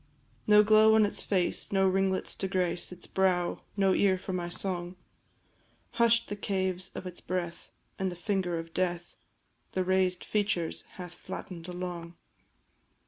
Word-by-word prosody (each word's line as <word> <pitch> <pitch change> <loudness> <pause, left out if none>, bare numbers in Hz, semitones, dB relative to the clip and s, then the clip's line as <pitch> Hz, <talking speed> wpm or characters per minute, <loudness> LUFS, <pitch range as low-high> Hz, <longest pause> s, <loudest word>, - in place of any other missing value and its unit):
No 210 0 +7
glow 215 +1 +6
on 220 -1 +6
its 205 - 0
face, 185 -3 0
no 195 -1 +3
ringlets 190 0 +1
to 195 - -3
grace 180 -2 0
Its 180 -1 -4
brow, 180 -2 +1
and - - -10 0.2
no 195 -1 +4
ear 190 -1 +3
for 185 0 -6
my 175 -1 -2
song; 175 -1 -2 1.0
Hush'd 235 0 +3
the 205 - -4
caves 190 -2 -1
of - - -6
its 180 -1 -6
breath, 175 -2 -4 0.3
and 190 -1 0
the - - -7
finger 180 -2 -1
of 165 0 -7
death 175 -1 -2 0.6
The 185 - +1
raised 185 -1 +1
features 200 -6 -1
hath 180 -2 -8
flatten'd 175 -1 -8
along. 175 -1 -6
185 Hz, 155 wpm, -29 LUFS, 175-195 Hz, 1.0 s, No